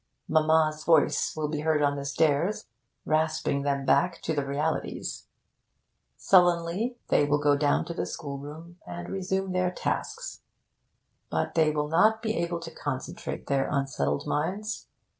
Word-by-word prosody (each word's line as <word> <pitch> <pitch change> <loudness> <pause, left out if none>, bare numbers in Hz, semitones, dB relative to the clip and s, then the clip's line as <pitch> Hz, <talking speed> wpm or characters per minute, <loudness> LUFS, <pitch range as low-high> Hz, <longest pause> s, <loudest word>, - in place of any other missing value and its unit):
Mamma's 155 0 +3
voice 160 -2 +3
will 155 -1 -1
be 150 0 -3
heard 155 -1 +1
on 145 0 +2
the 140 0 -5
stairs, 155 +7 +1 0.4
rasping 155 -2 +1
them 140 -1 -1
back 170 +7 +3
to 160 - -1
the 145 -2 0
realities. 145 +3 -3 0.9
Sullenly 180 +6 +3
they - - +4
will 145 0 +2
go 145 -1 +3
down 145 0 +2
to 170 - -5
the - - -3
schoolroom, 150 +4 -7
and 85 -1 -6
resume 190 0 -2
their 185 0 +1
tasks. 470 - -4 0.9
But - - -1
they 160 -2 +4
will 150 -1 -1
not 220 +8 +3
be 220 -1 0
able 170 0 -1
to 165 0 -8
concentrate 135 -3 -5
their 135 -1 0
unsettled 135 - -1
minds. 200 +8 -2
155 Hz, 145 wpm, -27 LUFS, 145-175 Hz, 0.9 s, they